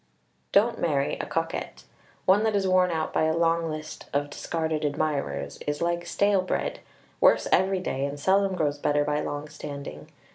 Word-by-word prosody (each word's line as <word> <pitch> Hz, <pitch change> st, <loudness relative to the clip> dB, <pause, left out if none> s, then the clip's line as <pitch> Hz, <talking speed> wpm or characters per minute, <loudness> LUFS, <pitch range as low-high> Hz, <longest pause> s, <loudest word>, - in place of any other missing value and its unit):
Don't 225 Hz, +3 st, +3 dB
marry 140 Hz, -4 st, +1 dB
a -, -, -3 dB
coquette. -, -, -3 dB, 0.4 s
One 190 Hz, +3 st, +5 dB
that 220 Hz, -1 st, +1 dB
is 195 Hz, -1 st, +1 dB
worn 185 Hz, -1 st, +4 dB
out 160 Hz, -2 st, -2 dB
by -, -, +2 dB
a 160 Hz, +1 st, +1 dB
long 165 Hz, 0 st, +2 dB
list 155 Hz, 0 st, -7 dB
of 145 Hz, 0 st, 0 dB
discarded 160 Hz, -1 st, -2 dB
admirers 140 Hz, -, -2 dB
is 145 Hz, 0 st, -1 dB
like 170 Hz, 0 st, -1 dB
stale 200 Hz, -1 st, +2 dB
bread 185 Hz, -, -2 dB, 0.4 s
worse -, -, +5 dB
every 190 Hz, 0 st, +3 dB
day 135 Hz, -6 st, -2 dB
and 140 Hz, +1 st, -5 dB
seldom 195 Hz, +4 st, +2 dB
grows 145 Hz, -4 st, 0 dB
better 145 Hz, 0 st, +2 dB
by 150 Hz, 0 st, 0 dB
long 145 Hz, +1 st, -4 dB
standing. 140 Hz, -, -8 dB
160 Hz, 175 wpm, -26 LUFS, 145-185 Hz, 0.4 s, One